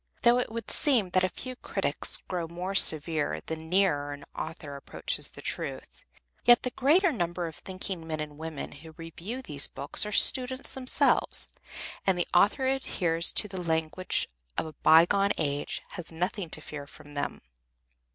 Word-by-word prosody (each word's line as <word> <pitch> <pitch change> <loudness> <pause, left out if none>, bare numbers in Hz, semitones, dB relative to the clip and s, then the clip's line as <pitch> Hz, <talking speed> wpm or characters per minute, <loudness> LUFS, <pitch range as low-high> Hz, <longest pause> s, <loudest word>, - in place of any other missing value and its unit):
Though 240 +1 +5
it 245 - -3
would 230 -1 -3
seem 235 -11 +3
that 185 0 +2
a 185 - +1
few 255 +5 -7
critics - - 0
grow 175 -3 -3
more 180 +3 -5
severe 155 - +3
the 160 - -4
nearer 160 -3 0
an 145 0 -11
author 155 -2 -7
approaches 140 - -1
the - - -13
truth, - - -5 0.4
yet 240 -1 +6
the 250 - -2
greater 320 +9 +3
number 175 - -3
of 160 -2 -8
thinking 185 -3 -6
men 155 -1 -4
and 150 -1 -7
women 160 -2 -6
who 160 +2 -13
review 175 +10 -7
these 145 - -1
books - - -1
are 210 - -5
students 260 +4 +5
themselves, 260 -1 +3 0.6
and 190 -2 +3
the 175 - -1
author 205 +9 +3
who 260 - +2
adheres 170 -9 +1
to 210 - +3
the 190 -2 -6
language 160 +2 -1 0.3
of - - -1
a 155 - -9
by 160 +3 +6
gone 200 +2 +1
age 145 -2 -2
has 175 -2 -7
nothing 180 +2 -3
to 155 - -8
fear 145 -2 -8
from 145 +1 -15
them. 145 - -4
175 Hz, 175 wpm, -28 LUFS, 160-210 Hz, 0.6 s, yet